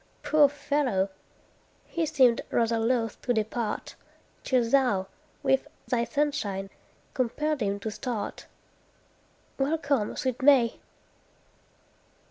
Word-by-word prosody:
Poor 300 -2 +5
fellow! 275 -9 0 0.8
he 330 -2 -2
seemed 260 -6 +4
rather 230 -1 +1
loth 225 -1 0
to 245 - 0
depart, 220 0 -2 0.5
Till 250 -3 +2
thou, 240 -7 +2 0.4
with 270 -1 +2 0.2
thy 235 -2 +1
sunshine, 230 -8 -1 0.4
compelled 295 +3 -1
him 200 -1 0
to 220 - -3
start. 215 -1 -5 1.1
Welcome, 280 -5 0
sweet 260 -3 -2
May! 260 -4 +5
245 Hz, 100 wpm, -27 LUFS, 220-280 Hz, 1.1 s, Poor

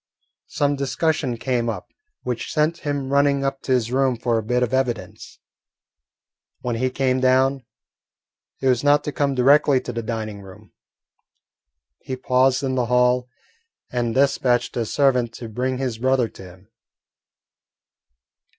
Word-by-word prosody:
Some 145 0 0
discussion 140 -1 -1
came 120 -1 -1
up 110 - -6 0.3
which 125 -2 -4
sent 155 +2 +1
him 145 -2 -3
running 140 -1 +3
up 135 0 -2
to - - -4
his 120 -2 +1
room 130 -1 +1
for 115 -1 0
a - - -5
bit 125 +3 0
of 125 - -2
evidence. 115 -6 -3 1.2
When 120 -2 -2
he 130 +2 0
came 130 0 0
down 130 +1 +2 1.0
it 135 - 0
was 125 -1 +2
not 145 0 +4
to 150 - -3
come 140 0 0
directly 140 +1 +4
to - - -6
the 115 - -3
dining 110 -2 -5
room. 95 -1 -15 1.3
He 130 - -5
paused 130 +1 +2
in 130 -1 -1
the 125 -2 0
hall 125 0 +2 0.6
and 120 -2 -1
despatched 125 -3 +1
a 115 -2 -1
servant 125 -3 +1
to 115 0 -8
bring 125 +4 -2
his 125 -4 -3
brother 130 -1 +2
to - - -13
him. 90 +3 -16
130 Hz, 150 wpm, -22 LUFS, 120-135 Hz, 1.3 s, not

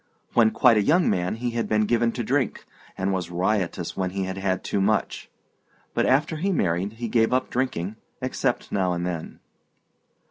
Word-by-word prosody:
When 115 -2 +5
quite 120 0 +4
a - - +4
young 165 - +3
man 90 +2 0
he 120 +1 -3
had 115 0 -2
been 105 0 +3
given 115 +1 +2
to 120 - -3
drink, 130 +1 -1 0.3
and 95 +1 0
was 90 -2 -2
riotous 90 -1 -1
when 95 -1 -1
he 95 +1 -3
had 95 +1 -4
had 95 -1 -1
too 100 - -1
much; 105 +2 0 0.6
but - - +1
after 150 +4 +2
he 195 +6 0
married 95 - 0
he 115 +1 -5
gave 115 0 +2
up 130 0 0
drinking, 110 -6 -2 0.2
except - - -2
now 95 -3 +1
and 85 0 -2
then. 85 -3 -5
105 Hz, 185 wpm, -25 LUFS, 95-120 Hz, 0.6 s, When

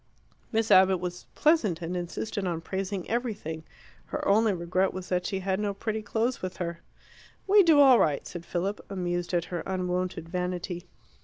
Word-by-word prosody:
Miss 225 -1 +1
Abbott 190 0 +6
was 180 0 -6
pleasant, 240 - +3
and 175 +1 -4
insisted 185 +3 -3
on 170 -2 -1
praising 190 +1 -3
everything: 210 -10 -3 0.4
her - - -3
only 215 +2 +4
regret 185 +1 0
was 185 -1 -6
that 180 -1 0
she 190 -1 -2
had 190 +1 -1
no 205 -1 -1
pretty 220 +1 -3
clothes 225 +4 -1
with 185 -1 -5
her. 170 -1 -4 0.7
"We 405 +1 +7
do 325 -5 +5
all 265 -4 +8
right," 145 -3 +1
said 175 -2 -7
Philip, 190 +4 -3
amused 175 -2 -2
at 175 -2 +1
her 175 - -1
unwonted 180 -2 -2
vanity. 180 0 -3
185 Hz, 170 wpm, -28 LUFS, 175-210 Hz, 0.7 s, all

